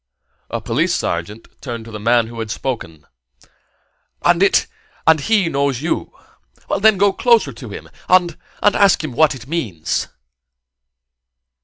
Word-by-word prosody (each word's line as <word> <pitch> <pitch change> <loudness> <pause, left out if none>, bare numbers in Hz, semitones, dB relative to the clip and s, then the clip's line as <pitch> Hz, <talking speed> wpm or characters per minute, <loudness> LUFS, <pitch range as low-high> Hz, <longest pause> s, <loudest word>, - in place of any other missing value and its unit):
A - - -3
police - - 0
sergeant 85 +7 -4
turned 115 -4 -6
to 115 - -11
the 105 - -7
man 115 +2 +3
who 115 0 -9
had 110 -1 -4
spoken. 105 - -5 1.2
"And - - +3
it - - +4 0.5
he 205 +3 +2
knows 140 -3 -1
you? 160 - -2 0.7
Then 215 0 +5
go 200 +1 +3
closer 225 - +3
to 115 0 -10
him, 100 - -9 0.2
and 180 -3 +4 0.3
and 205 - +4
ask 200 -4 +4
him 155 - -4
what 150 +3 +3
it 125 -2 -11
means." 120 - -2
135 Hz, 140 wpm, -19 LUFS, 115-175 Hz, 1.2 s, Then